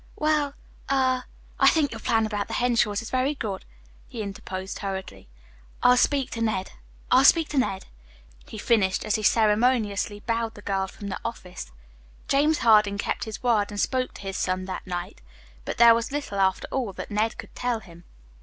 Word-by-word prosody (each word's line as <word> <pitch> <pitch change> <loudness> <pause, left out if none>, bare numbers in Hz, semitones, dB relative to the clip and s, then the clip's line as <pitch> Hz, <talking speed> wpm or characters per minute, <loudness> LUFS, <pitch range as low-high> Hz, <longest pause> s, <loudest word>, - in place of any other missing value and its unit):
"Eh? - - -27 0.2
Well 300 -2 +1 0.4
er, 260 -2 +2 0.3
I - - +6
think 305 -3 +3
your - - -6
plan 225 -2 +1
about 205 -2 -3
the - - -4
Henshaws 230 -4 +1
is 230 - -8
very 260 +3 +1
good," 205 -8 -5 0.4
he 225 - -5
interposed 190 -1 -6
hurriedly. 190 - -6 0.6
"I'll 250 - +7
speak 275 +1 +2
to 230 - -4
Ned 215 -4 -1 0.4
I'll 260 - +6
speak 320 +3 +5
to 285 - +1
Ned," 195 -7 -1 0.6
he - - -9
finished, 205 -4 +1
as 215 - 0
he 220 - 0
ceremoniously 215 -1 +2
bowed 230 0 -2
the 205 - -12
girl 195 -1 -1
from 200 +1 -8
the - - -4
office. 185 - -7 0.6
James 295 +3 +3
Harding 210 -3 +5
kept 200 - -2
his 220 +1 -7
word, 225 -4 +2
and 205 - -6
spoke 255 +2 -1
to - - -10
his 195 -1 -4
son 185 0 -1
that 190 0 -6
night; 175 -1 -5 0.4
but - - -4
there 235 0 +8
was 230 +3 -1
little, 285 -9 -3
after 190 -1 +1
all, 245 -7 -2
that - - -8
Ned 215 +2 0
could - - -10
tell 245 -2 -1
him. 170 -4 -15
220 Hz, 190 wpm, -25 LUFS, 195-250 Hz, 0.6 s, there